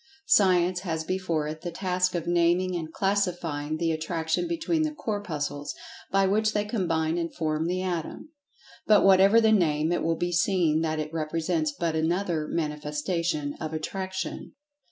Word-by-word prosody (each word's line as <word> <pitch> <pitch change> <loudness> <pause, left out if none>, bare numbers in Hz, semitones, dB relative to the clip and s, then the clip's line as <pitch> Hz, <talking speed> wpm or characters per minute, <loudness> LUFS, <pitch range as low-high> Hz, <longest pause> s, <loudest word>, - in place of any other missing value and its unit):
Science 180 - +4
has 165 -4 -3
before 170 -4 -1
it 155 +1 -6
the 175 - -4
task 180 +1 -1
of 170 -2 -2
naming, 175 +1 +2
and 160 -2 -4
classifying, 175 -7 -1
the 165 0 0
attraction 160 - -1
between 335 -1 0
the 310 -1 0
Corpuscles, 155 - -4 0.3
by 195 +1 +3
which 215 +3 +2
they 210 0 0
combine 170 -6 0
and 170 -1 -4
form 155 0 -1
the 185 +1 -1
Atom. 175 - -4 0.6
But 210 -1 +6
whatever 195 +3 +6
the 220 -1 +4
name, 160 -6 +2
it 175 - 0
will 165 0 0
be 175 0 -1
seen 170 -3 +2
that 160 -1 -1
it 155 +1 -4
represents 160 0 -1
but 165 +1 -2
another 165 -1 0
manifestation 150 0 -2
of 155 0 -4
"Attraction." 190 +4 -4
170 Hz, 155 wpm, -27 LUFS, 155-190 Hz, 0.6 s, But